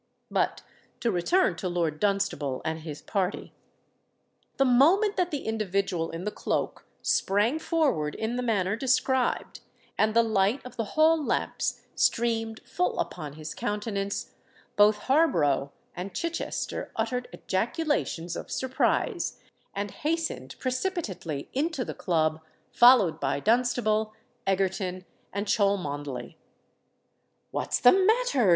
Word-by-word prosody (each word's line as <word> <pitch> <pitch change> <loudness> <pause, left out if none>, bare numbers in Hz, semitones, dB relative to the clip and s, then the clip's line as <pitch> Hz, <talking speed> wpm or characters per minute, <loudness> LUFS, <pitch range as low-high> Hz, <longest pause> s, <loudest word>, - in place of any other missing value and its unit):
But - - 0 0.4
to 235 - +1
return 210 - +2
to 185 - -3
Lord 165 -3 -1
Dunstable 195 -10 0
and 160 0 -2
his 155 -2 -8
party. 195 -1 -2 1.0
The 270 - +4
moment 340 - +4
that 360 -1 +1
the 290 -4 -4
individual 195 -6 -1
in 165 +2 -6
the 210 - -2
cloak - - -3 0.2
sprang 210 +10 +2
forward 290 - 0
in 220 +2 -2
the 250 - -1
manner 205 -5 +1
described, 260 +1 +1 0.4
and 215 0 +3
the 230 - +6
light 220 +2 +2
of 250 - -9
the 225 +5 -5
hall 315 0 +5
lamps - - -1
streamed 225 -1 +1
full 180 0 -1
upon 150 -5 -4
his 155 0 -7
countenance, 205 -1 -3 0.4
both 210 +1 +5
Harborough 165 - +2 0.2
and 180 +1 -6
Chichester 335 0 -3
uttered 245 +3 -1
ejaculations 190 - -1
of - - -6
surprise, 265 - 0 0.4
and 200 0 -3
hastened 305 - -2
precipitately 250 - -3
into 285 -1 -1
the - - -5
Club, 160 -3 0 0.3
followed 240 -9 +6
by 140 0 0
Dunstable, 220 - +1 0.3
Egerton, 190 -1 0 0.3
and 200 +1 -2
Cholmondeley. 150 - -1 1.1
"What's - - -1
the 245 - +8
matter?" 385 - +3
210 Hz, 120 wpm, -27 LUFS, 180-260 Hz, 1.1 s, the